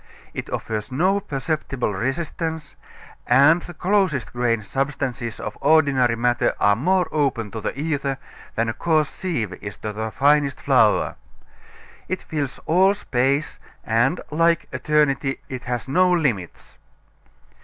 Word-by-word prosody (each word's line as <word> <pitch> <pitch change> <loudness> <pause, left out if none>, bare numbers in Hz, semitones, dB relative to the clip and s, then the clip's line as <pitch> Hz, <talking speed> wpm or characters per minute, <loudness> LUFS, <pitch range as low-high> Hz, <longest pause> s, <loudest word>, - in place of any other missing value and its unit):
It - - -5
offers 110 +1 -4
no 185 +9 +2
perceptible 140 - -3
resistance, 155 - -3 0.5
and 140 +7 +5
the 175 - -10
closest 185 - 0
grained 115 -3 0
substances 135 -3 -3
of 105 - -5
ordinary 140 -5 +4
matter 120 +1 +1
are 100 0 +4
more 180 - +2
open 130 -8 0
to 110 - -5
the 135 - -4
ether 140 -3 -1 0.4
than 115 +1 +1
a 115 - -1
coarse 155 +1 +1
sieve 130 - -3
is 100 -1 -7
to 105 - -5
the 110 +1 -3
finest 140 +2 +2
flour. - - +3 0.9
It 185 - -3
fills 145 -4 -4
all 190 +4 +4
space, 135 -4 0 0.2
and, 120 +9 +1
like 165 +2 +2
eternity, 140 0 +1
it 130 -2 -6
has 125 -1 -3
no 180 +6 +3
limits. 125 - -2
140 Hz, 135 wpm, -22 LUFS, 120-160 Hz, 0.9 s, and